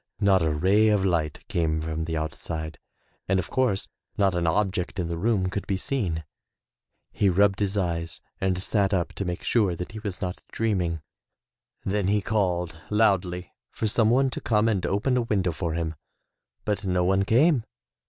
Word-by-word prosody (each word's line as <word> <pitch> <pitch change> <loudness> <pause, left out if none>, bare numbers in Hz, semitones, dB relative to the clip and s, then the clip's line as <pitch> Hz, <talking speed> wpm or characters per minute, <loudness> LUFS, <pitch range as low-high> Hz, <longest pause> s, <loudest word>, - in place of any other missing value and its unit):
Not 100 -2 +4
a 80 - +2
ray 95 +8 +3
of 105 -3 +3
light 80 -5 -1
came 80 -2 0
from 80 0 -3
the 80 -1 -2
out 80 -1 -2
side 80 -3 -5 0.5
and 95 - +2
of 95 - -3
course, 125 -7 +1 0.3
not 100 -2 +3
an 85 -1 0
object 95 +1 0
in 85 -3 -2
the 85 - -2
room 100 -2 +1
could 100 - -4
be 95 - 0
seen. 95 -8 -1 0.9
He 100 - +2
rubbed 100 +2 +3
his 100 0 0
eyes 85 -3 -2 0.2
and 95 -1 0
sat 100 -2 +1
up 85 -2 -1
to 100 - -4
make 90 -1 -4
sure 105 -7 +2
that 90 +6 -6
he 110 - -7
was 100 -4 -4
not 90 -1 -4
dreaming. 90 -8 -1 0.8
Then 100 -1 0
he 105 +1 +3
called 90 -6 -1
loudly 95 -5 +1 0.2
for - - -4
some 110 +1 +3
one 130 +2 +3
to - - -5
come 110 -1 +2
and 100 -5 +1
open 125 +6 +1
a - - +3
window 100 -6 0
for 80 +1 -3
him, 80 -1 -2 0.7
but 105 0 -1
no 90 -2 +1
one 95 +2 +3
came. 125 - +4
95 Hz, 185 wpm, -26 LUFS, 85-105 Hz, 0.9 s, Not